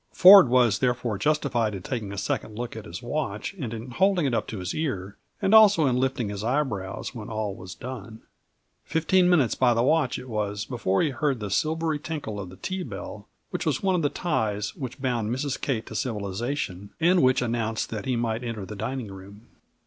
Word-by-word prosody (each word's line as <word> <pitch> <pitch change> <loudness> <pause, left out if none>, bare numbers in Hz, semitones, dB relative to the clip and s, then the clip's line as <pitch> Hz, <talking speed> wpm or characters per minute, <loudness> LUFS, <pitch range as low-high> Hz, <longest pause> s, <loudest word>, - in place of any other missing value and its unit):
Ford 185 -6 +9
was 120 -4 +4
therefore 120 -4 0
justified 125 -8 +1
in 95 - -7
taking 115 -3 -4
the 100 - -6
second 105 +2 -3
look 120 -1 -5
at 110 - -7
his 85 +5 -8
watch 120 - -3
and 135 - -5
in 115 +2 -7
holding 185 +4 +2
it 135 - 0
up - - 0
to 110 - -5
his 90 0 -4
ear, 100 - -3 0.2
and 195 - +1
also 205 -7 +7
in 130 -3 +2
lifting 130 -3 0
his 100 0 -5
eyebrows 115 -8 -2
when 115 -1 -7
all 110 -2 -2
was 90 -1 -9
done. 115 -3 -8 0.6
Fifteen 180 +3 +2
minutes 150 -10 +4
by 125 -2 +3
the 115 - +2
watch 145 -2 +2
it 130 - -9
was 105 -2 -2
before 115 - 0
he 155 - +1
heard 140 -2 0
the 105 -2 -5
silvery 160 - 0
tinkle 145 -10 -5
of 95 -3 -6
the 90 - -11
tea 185 - -4
bell, - - -7 0.2
which - - -2
was - - -1
one 190 -1 +2
of 180 - +1
the 145 - +2
ties 110 - -1
which 130 -1 -6
bound 120 -5 -1
Mrs. 130 +3 -2
Kate 115 -5 -1
to - - -9
civilization, 105 -2 -3
and 175 +2 +4
which 130 0 +3
announced 115 -2 -2
that 110 -3 -4
he 130 - 0
might 115 0 -1
enter 115 -4 -4
the 105 - -8
dining 115 +1 -4
room. 100 +4 -12
120 Hz, 210 wpm, -26 LUFS, 105-145 Hz, 0.6 s, Ford